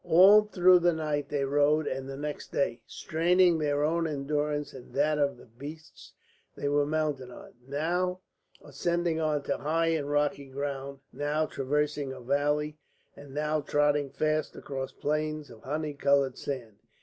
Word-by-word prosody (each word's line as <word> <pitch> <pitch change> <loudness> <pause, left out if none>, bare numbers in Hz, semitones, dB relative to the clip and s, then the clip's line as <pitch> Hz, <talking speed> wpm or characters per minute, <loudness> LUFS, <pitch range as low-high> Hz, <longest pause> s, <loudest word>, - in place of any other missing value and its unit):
All 200 +5 +7
through 185 -3 +5
that 175 0 +3
night 150 -3 -2
they 140 -2 0
rode 145 +2 +3
and 135 -1 -4
the 135 - -6
next 150 0 -5
day, 120 -4 0
straining 175 +1 +2
their 145 -1 +1
own 165 +2 +1
endurance 150 0 -2
and 130 -2 -12
that 150 +2 +2
of 140 -1 +1
the - - -15
beasts 145 +7 -11 0.4
they 145 - -3
were 145 0 +2
mounted 150 -4 -1
on, 125 - -12
now 175 +6 -1 0.4
ascending 170 +3 -1
on 155 -2 0
to 140 - -1
high 165 +2 +1
and 155 -3 -1
rocky 145 -1 0
ground, 140 0 -5
now 145 +3 0
traversing 145 0 -1
a 130 - -8
valley, 145 +4 0 0.4
and 145 -1 -12
now 150 +2 0
trotting 145 0 +1
fast 155 +2 -1
across 135 -1 -5
plains 155 -1 -2
of 110 -2 -14
honey 150 +2 -3
coloured 140 -2 +2
sand. 120 -7 -6
145 Hz, 160 wpm, -29 LUFS, 140-155 Hz, 0.4 s, All